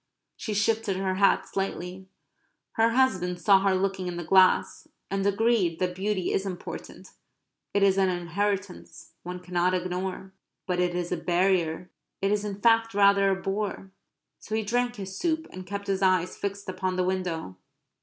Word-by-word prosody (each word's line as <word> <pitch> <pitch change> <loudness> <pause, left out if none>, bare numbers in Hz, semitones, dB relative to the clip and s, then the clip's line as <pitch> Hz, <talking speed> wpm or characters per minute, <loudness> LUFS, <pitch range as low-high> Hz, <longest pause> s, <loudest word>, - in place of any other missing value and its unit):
She 215 - -4
shifted 215 -1 +1
her 190 -1 -1
hat 200 0 +3
slightly. 190 -1 -4 0.6
Her 225 +1 +3
husband 190 -8 +1
saw 195 +3 +5
her 195 -1 +2
looking 190 -1 -1
in 175 -1 -4
the 175 - -4
glass; 185 +2 +3 0.2
and 195 0 0
agreed 200 -5 +2
that 180 0 -1
beauty 190 0 -1
is 195 - +1
important; 185 -3 -7 0.6
it 200 - +2
is 195 0 +4
an 190 -1 +3
inheritance; 185 +2 -3
one 180 +1 -6
cannot 180 0 0
ignore 180 +1 -2
it. 190 - -13 0.3
But 180 -1 -1
it 180 -1 +1
is 175 -1 -3
a 180 - 0
barrier; 180 -1 0 0.3
it 195 +1 0
is 210 0 +1
in 205 -1 -5
fact 225 -1 +3
rather 200 -1 +5
a 190 0 0
bore. 195 0 -3 0.5
So 215 - -5
he 220 - 0
drank 245 +3 0
his 190 -3 -7
soup; 320 - -1
and 185 0 -9
kept 200 0 -5
his 195 -1 -1
eyes 185 -2 +2
fixed 200 0 -5
upon 185 0 -2
the 185 - +1
window. 180 - -3
190 Hz, 175 wpm, -27 LUFS, 180-200 Hz, 0.6 s, saw